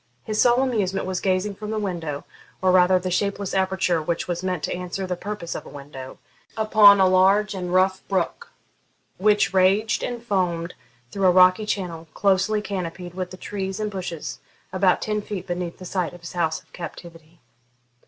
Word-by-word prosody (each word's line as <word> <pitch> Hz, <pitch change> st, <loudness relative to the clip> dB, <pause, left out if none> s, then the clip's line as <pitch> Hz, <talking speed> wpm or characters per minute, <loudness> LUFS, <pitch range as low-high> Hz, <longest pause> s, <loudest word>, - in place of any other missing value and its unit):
His 215 Hz, -1 st, 0 dB
sole 245 Hz, +1 st, +4 dB
amusement 200 Hz, -7 st, -1 dB
was 185 Hz, -1 st, -2 dB
gazing 190 Hz, +2 st, 0 dB
from 210 Hz, +2 st, -7 dB
the 220 Hz, -, -2 dB
window, 170 Hz, -8 st, -3 dB, 0.3 s
or 185 Hz, 0 st, +3 dB
rather 185 Hz, 0 st, +5 dB
the 180 Hz, 0 st, -3 dB
shapeless 200 Hz, +1 st, -1 dB
aperture 190 Hz, -3 st, +1 dB
which 170 Hz, +2 st, -2 dB
was 175 Hz, -1 st, -2 dB
meant 185 Hz, -4 st, -2 dB
to -, -, -1 dB
answer 180 Hz, +2 st, -4 dB
the 180 Hz, -1 st, -2 dB
purpose 200 Hz, -2 st, -5 dB
of -, -, -6 dB
a -, -, -12 dB
window, 140 Hz, -2 st, -10 dB, 0.4 s
upon 215 Hz, -2 st, +7 dB
a 190 Hz, -, +6 dB
large 195 Hz, +3 st, +4 dB
and 180 Hz, -2 st, -4 dB
rough 190 Hz, +1 st, +2 dB
brook, 190 Hz, -3 st, -2 dB, 0.7 s
which 210 Hz, 0 st, +3 dB
raged 195 Hz, +4 st, +3 dB
and 240 Hz, -1 st, -4 dB
foamed 180 Hz, -5 st, -1 dB, 0.4 s
through 195 Hz, -1 st, +1 dB
a -, -, +6 dB
rocky 185 Hz, +3 st, +5 dB
channel, 170 Hz, -6 st, -3 dB
closely 200 Hz, +2 st, +2 dB
canopied 180 Hz, -3 st, -5 dB
with 185 Hz, 0 st, -6 dB
trees 195 Hz, 0 st, -4 dB
and 210 Hz, -1 st, -2 dB
bushes, 180 Hz, -5 st, -5 dB, 0.3 s
about 185 Hz, -1 st, +2 dB
ten 210 Hz, -1 st, -1 dB
feet 200 Hz, -3 st, -6 dB
beneath 175 Hz, -2 st, -4 dB
the 185 Hz, -, -10 dB
site 180 Hz, -1 st, -2 dB
of 175 Hz, -, -12 dB
his 170 Hz, -, -8 dB
house 165 Hz, -3 st, -1 dB
of -, -, -34 dB
captivity. 170 Hz, -2 st, -10 dB
185 Hz, 180 wpm, -23 LUFS, 175-200 Hz, 0.7 s, upon